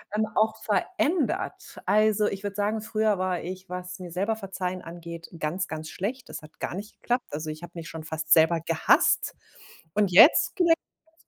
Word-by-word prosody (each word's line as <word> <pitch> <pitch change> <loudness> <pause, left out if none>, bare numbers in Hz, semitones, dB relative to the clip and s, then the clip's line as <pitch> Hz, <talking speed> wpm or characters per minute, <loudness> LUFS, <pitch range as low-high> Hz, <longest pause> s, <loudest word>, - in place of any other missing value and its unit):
ähm, 215 - +2
auch 220 0 +3
verändert. 315 - -1
Also, 215 +2 +3
ich 195 -1 -2
würde 200 -1 -4
sagen, 210 +1 0
früher 215 -2 +1
war 185 -1 0
ich, 185 +1 -7
was 180 0 -6
mir 180 -1 -7
selber 200 +6 0
verzeihen 185 -3 -4
angeht, 170 0 -9
ganz, 165 +5 -2
ganz 155 0 -6
schlecht. 240 +7 -4
Das - - -7
hat 155 0 -16
gar - - -3
nicht 205 +4 -7
geklappt. 245 +1 0
Also, 155 +1 -4
ich 155 - -9
habe 175 0 -10
mich 165 -1 -7
schon 160 -1 -7
fast 160 0 +1
selber 165 +1 +5
gehasst 165 0 +2 0.6
und 205 -2 +2
jetzt 225 - +7
gelingt 345 -3 +5 0.4
es 325 - -30
185 Hz, 185 wpm, -26 LUFS, 170-215 Hz, 0.6 s, jetzt